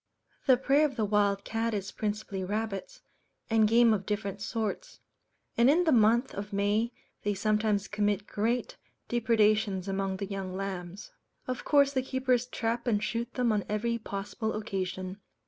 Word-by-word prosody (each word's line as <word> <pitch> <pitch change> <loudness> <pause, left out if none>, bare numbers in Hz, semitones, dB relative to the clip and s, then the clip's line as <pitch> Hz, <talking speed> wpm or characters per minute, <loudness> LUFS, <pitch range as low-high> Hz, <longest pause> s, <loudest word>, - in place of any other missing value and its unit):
The 260 -2 +7
prey 275 +3 +3
of 290 -4 +1
the 220 -3 0
Wild 200 -1 +2
Cat 225 0 -1
is 200 -1 -4
principally 205 -2 -3
rabbits, 215 - -4 0.5
and 220 -1 +5
game 230 +1 +5
of 195 -2 -2
different 200 -1 -3
sorts; 225 - -3 0.6
and 235 +2 +5
in 330 +5 +4
the 320 - +3
month 235 +1 +4
of 205 +2 -6
May 205 +4 +1 0.3
they 205 0 -1
sometimes 210 0 +1
commit 205 -1 0
great 240 - -1 0.3
depredations 215 -4 +2
among 195 0 -1
the 200 - -3
young 190 -2 -5
lambs. 190 0 -5 0.4
Of 255 -1 -3
course 280 -1 +4
the 260 - +1
keepers 255 -2 0
trap 235 0 -2
and 210 -3 +2
shoot 235 +2 -2
them 245 -2 +2
on 210 -2 +1
every 230 +3 0
possible 210 +1 -4
occasion. 190 -2 -4
215 Hz, 160 wpm, -29 LUFS, 200-235 Hz, 0.6 s, The